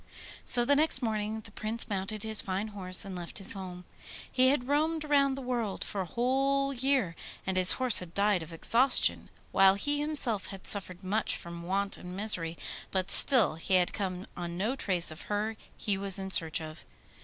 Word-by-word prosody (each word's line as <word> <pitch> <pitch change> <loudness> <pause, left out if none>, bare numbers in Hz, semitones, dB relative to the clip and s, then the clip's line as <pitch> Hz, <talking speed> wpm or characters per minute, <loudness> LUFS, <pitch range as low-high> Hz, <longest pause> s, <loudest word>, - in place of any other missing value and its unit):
So 240 -1 +6
the 285 +3 +3
next 295 -3 +2
morning 220 -1 -2
the 205 - -12
Prince 220 +3 -1
mounted 200 0 -4
his 220 -1 0
fine 195 +3 -4
horse 185 -3 -1
and 195 -2 -7
left 175 -1 -6
his 195 - +2
home. 180 -2 -9 0.5
He 255 0 +3
had 260 -2 +1
roamed 310 +3 0
round 280 -2 +2
the 270 - -7
world 235 -5 -3
for 200 - -4
a 185 - -5
whole 275 +6 0
year, 260 -9 0 0.3
and 190 - -2
his 185 0 +5
horse 255 -3 +4
had 175 -2 -9
died 200 -2 +1
of 160 +1 -9
exhaustion, 240 +10 +2 0.2
while 195 0 +5
he 290 +9 -1
himself 285 -9 -1
had 195 -1 -9
suffered 185 -2 0
much 210 +4 0
from 170 0 -9
want 195 +3 -1
and 180 +1 -9
misery, 175 -6 +3 0.3
but 190 0 -2
still 235 - +5
he 185 +3 0
had 180 -1 +2
come 185 -3 -4
on 175 -1 -6
no 215 +8 -1
trace 180 -10 +1
of 155 - -10
her 210 +2 -2 0.2
he 200 -2 -1
was 195 -1 +2
in 190 0 -4
search 160 -2 +2
of. 155 0 -9
205 Hz, 195 wpm, -29 LUFS, 185-250 Hz, 0.5 s, So